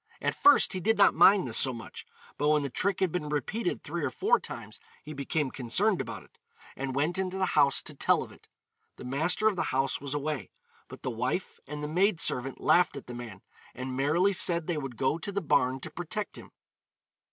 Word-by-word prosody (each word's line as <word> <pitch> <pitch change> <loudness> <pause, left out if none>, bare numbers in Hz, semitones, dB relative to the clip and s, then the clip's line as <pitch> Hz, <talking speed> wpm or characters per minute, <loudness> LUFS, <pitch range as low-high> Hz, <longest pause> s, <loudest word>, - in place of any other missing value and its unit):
At - - -1
first 290 - +5
he 185 - -3
did 220 +5 +1
not 200 - +6
mind 195 -7 +5
this 115 - 0
so 130 - +4
much, 115 -1 -9 0.3
but 145 +1 0
when 150 -1 +3
the 140 - -4
trick 195 +8 -1
had 185 -3 +2
been 155 -4 -3
repeated 175 +8 -2
three 165 +1 -4
or 140 - 0
four 120 - +2
times - - -9 0.2
he 155 - -8
became 140 0 -2
concerned 175 - +1
about 115 -3 -7
it, - - -26 0.4
and 130 -1 -4
went 155 +7 0
into 190 0 -2
the 190 - +1
house 140 -2 +3
to - - -5
tell - - +2
of - - -12
it. - - -19 0.5
The - - -11
master 160 +11 +1
of 215 - +2
the - - -1
house 135 +1 0
was 140 0 -3
away, 145 -4 -3 0.4
but - - -12
the - - -2
wife - - -3
and 150 +1 -6
the - - -2
maid 180 +3 +2
servant 130 -2 +1
laughed 175 -5 +3
at 140 - -9
the 125 - -8
man, 120 -5 -9 0.3
and 130 0 -5
merrily 160 +9 +2
said 170 -2 +1
they 175 - -2
would 135 -5 -6
go 135 +6 0
to 200 - -5
the 200 - -1
barn 130 -6 +1
to - - -6
protect 175 +5 -4
him. - - -11
150 Hz, 220 wpm, -28 LUFS, 135-180 Hz, 0.5 s, not